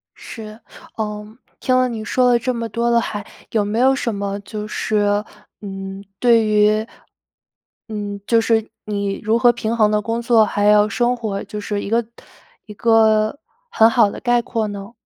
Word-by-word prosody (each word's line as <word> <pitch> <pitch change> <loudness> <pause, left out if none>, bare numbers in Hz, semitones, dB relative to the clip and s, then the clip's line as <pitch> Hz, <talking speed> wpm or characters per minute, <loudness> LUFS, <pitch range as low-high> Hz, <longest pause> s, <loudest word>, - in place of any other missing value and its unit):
是， 215 -1 -10 0.4
呃， 210 +1 -5 0.2
听 255 -1 +1
了 255 0 +3
你 225 -3 -5
说 250 +4 +2
了 240 - +3
这 255 +2 -1
么 230 -1 -3
多 235 +2 -1
的 235 0 +4
还 210 -2 -4 0.3
有 215 -2 +1
没 210 +3 -2
有 265 +2 +4
什 235 -4 -2
么 200 0 -3
就 210 +1 -6
是， 205 -1 0 0.4
嗯， 195 -1 -7 0.2
对 235 -2 +4
于， 215 +1 +3 1.0
嗯， 205 -2 -5
就 230 - +4
是 225 -1 +1 0.2
你 200 -1 -3
如 220 +2 +1
何 240 0 +5
平 230 -1 -3
衡 215 -2 +3
的 210 0 +1
工 230 +2 -2
作 230 -2 +4
还 205 0 -1
有 210 0 +5
生 240 +2 +1
活， 215 -5 -4
就 210 +1 -7
是 205 0 -3
一 - - -5
个 230 +1 +1 0.6
一 210 - -10
个 220 +2 +3 0.3
很 225 - +5
好 230 -3 +4
的 - - -8
概 240 -1 +2
括 225 -2 -2
呢？ 200 0 -7
215 Hz, 195 characters per minute, -20 LUFS, 210-235 Hz, 1.0 s, 何